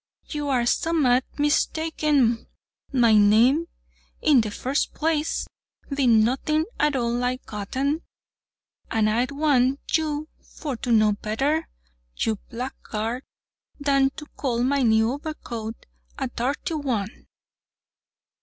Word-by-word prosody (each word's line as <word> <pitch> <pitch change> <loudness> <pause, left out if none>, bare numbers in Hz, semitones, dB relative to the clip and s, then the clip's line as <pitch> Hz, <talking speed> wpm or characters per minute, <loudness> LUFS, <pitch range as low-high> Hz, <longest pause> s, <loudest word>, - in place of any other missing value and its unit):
you 295 -2 -3
are 255 -3 +2
a - - -1
sum'mat 260 -3 +2
mistaken—my 290 -5 +1
name, 225 +10 +5 0.5
in 285 -5 +5
the 215 - -3
first 260 +7 -2
place, 315 0 0 0.5
bee'nt 245 -6 +4
nothing 305 +6 +1
at 295 -1 +2
all 235 -2 0
like 250 +1 -1
Goddin, 265 +9 -2 0.9
and 220 -1 +2
I'd 235 +4 +1
want 280 -2 +2 0.2
you 305 -1 -3 0.2
for 290 -5 -6
to 245 +1 -3
know 215 -2 +5
better, 270 +10 -1 0.5
you 220 -2 0
blackguard, 235 -1 -4 0.6
than 275 -1 +3
to 305 - -8
call 245 -5 -2
my 275 +2 +2
new 220 -1 +3
obercoat 235 -8 -6 0.4
a 270 - -1
darty 285 +5 -2
one." 225 -6 -3
260 Hz, 115 wpm, -24 LUFS, 230-295 Hz, 0.9 s, name